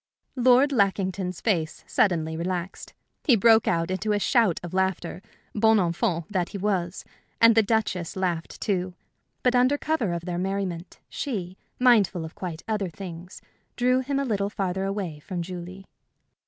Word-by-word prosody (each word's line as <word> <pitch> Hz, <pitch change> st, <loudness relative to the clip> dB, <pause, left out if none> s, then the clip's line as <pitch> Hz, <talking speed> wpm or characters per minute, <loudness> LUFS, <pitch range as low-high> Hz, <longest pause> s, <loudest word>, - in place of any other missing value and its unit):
Lord 255 Hz, +2 st, +5 dB
Lackington's 190 Hz, -5 st, 0 dB
face 165 Hz, -8 st, -1 dB
suddenly 160 Hz, -5 st, +1 dB
relaxed. 180 Hz, +2 st, -4 dB, 0.3 s
He 255 Hz, -, +5 dB
broke 225 Hz, +1 st, +5 dB
into 185 Hz, +5 st, 0 dB
a 205 Hz, -, +1 dB
shout 220 Hz, -, +2 dB
of 175 Hz, 0 st, -7 dB
laughter, 190 Hz, -2 st, -1 dB, 0.3 s
bon 220 Hz, +1 st, +4 dB
enfant 170 Hz, -2 st, 0 dB
that 180 Hz, -3 st, 0 dB
he 200 Hz, -, -6 dB
was; 190 Hz, -3 st, -2 dB, 0.3 s
and 230 Hz, 0 st, +7 dB
the 225 Hz, -, +5 dB
Duchess 205 Hz, -5 st, -1 dB
laughed, 175 Hz, -3 st, -2 dB
too; 185 Hz, -3 st, -1 dB, 0.5 s
but 250 Hz, -, +3 dB
under 255 Hz, +3 st, +3 dB
cover 275 Hz, -, -1 dB
of 170 Hz, 0 st, -4 dB
their 175 Hz, -1 st, -3 dB
merriment 190 Hz, -2 st, -3 dB
she, 190 Hz, -10 st, -4 dB, 0.2 s
mindful 205 Hz, -9 st, +3 dB
of 160 Hz, -, -9 dB
quite 175 Hz, -3 st, -6 dB
other 210 Hz, -4 st, -1 dB
things, 175 Hz, 0 st, -9 dB, 0.3 s
drew 250 Hz, +1 st, +2 dB
him 275 Hz, +2 st, -2 dB
a 275 Hz, -, 0 dB
little 200 Hz, -4 st, 0 dB
farther 190 Hz, -2 st, -2 dB
away 195 Hz, -6 st, -3 dB
from 175 Hz, +3 st, -5 dB
Julie. 180 Hz, +2 st, -8 dB
190 Hz, 155 wpm, -25 LUFS, 175-220 Hz, 0.5 s, and